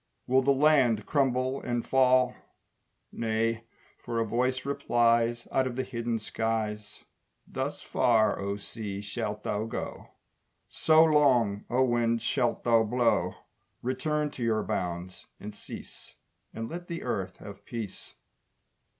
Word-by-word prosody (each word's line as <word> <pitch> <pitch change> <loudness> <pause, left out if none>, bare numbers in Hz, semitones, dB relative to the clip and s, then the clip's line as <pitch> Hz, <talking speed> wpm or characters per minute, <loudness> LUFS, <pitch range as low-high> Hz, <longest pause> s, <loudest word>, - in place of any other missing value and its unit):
Will 130 +1 +4
the 140 +1 +3
land 135 -6 +4
crumble 130 -1 +1
and 120 -1 -2
fall? 130 -1 +4 0.8
Nay, 115 0 -1 0.3
for 115 -1 -3
a 115 - +1
voice 125 +4 0
replies 120 -4 +2
Out 130 -1 +2
of 125 - -5
the 130 - -1
hidden 115 -2 -2
skies, 110 -1 -3 0.4
"Thus - - -4
far, 110 -3 +2
O 100 +1 -2
sea, 105 -1 -6
shalt 105 +1 -4
thou 105 +1 -1
go, 115 - -6 0.6
So 160 0 +4
long, 130 -10 +3
O 125 +2 +3
wind, 120 -2 +1
shalt 125 -4 0
thou 115 -1 +4
blow: 120 +2 +1 0.5
Return 150 +4 -1
to 125 - -6
your 110 -2 +1
bounds 90 0 -4
and 105 +1 -7
cease, - - -10 0.4
And 115 0 -5
let 175 +4 -7
the 170 -1 -5
earth 95 -7 -3
have 100 0 -11
peace!" 115 -4 -7
120 Hz, 135 wpm, -28 LUFS, 110-130 Hz, 0.8 s, Will